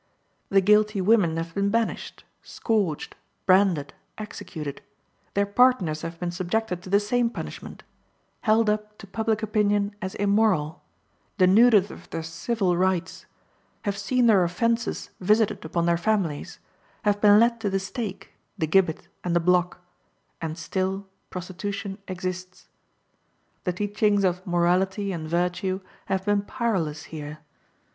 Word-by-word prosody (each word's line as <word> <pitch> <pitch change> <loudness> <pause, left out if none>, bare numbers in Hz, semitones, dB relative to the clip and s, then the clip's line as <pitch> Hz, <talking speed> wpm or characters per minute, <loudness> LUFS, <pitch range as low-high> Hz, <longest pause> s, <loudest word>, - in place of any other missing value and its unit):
The 195 0 +4
guilty 210 +1 +4
women 185 -5 +3
have 165 0 -4
been 200 +2 +1
banished, 230 +1 -2 0.2
scourged, 200 - -2 0.3
branded, 185 -7 +3 0.2
executed; 160 -7 -7 0.5
their 200 0 +3
partners 200 -8 +3
have 165 0 -6
been 175 -1 -2
subjected 180 +1 -2
to 185 - -10
the 200 +1 +4
same 235 +3 +1
punishment; - - -8 0.6
held 220 0 +3
up 210 0 -1
to - - -11
public 220 +2 -1
opinion 205 -1 +1
as 190 -1 -4
immoral; 200 -6 +1 0.6
denuded 205 +2 +5
of - - -13
their 165 - -4
civil 180 +3 -1
rights; 185 0 -1 0.6
have 200 -3 -1
seen 225 +5 +1
their 205 -5 +5
offenses 230 +7 -1
visited 210 +1 +2
upon 170 +1 -1
their 170 0 +3
families; 180 -6 -1 0.5
have 205 -1 +1
been 205 0 +7
led 235 +1 +3
to 205 - 0
the 195 - 0
stake, 195 -1 -6 0.3
the 160 - 0
gibbet, 165 0 +2 0.2
and 175 -1 -1
the - - +5
block, 180 +1 +1 0.6
and 160 0 -4
still 190 +3 -2 0.2
prostitution 195 +2 -5
exists. 185 0 -6 1.0
The 180 - 0
teachings 205 +1 +1
of 185 0 0
morality 185 +3 +1
and 160 -3 -5
virtue 180 +3 0 0.3
have 190 0 -1
been 205 -1 +2
powerless 200 - -2
here. 150 -1 -7
195 Hz, 135 wpm, -25 LUFS, 175-210 Hz, 1.0 s, been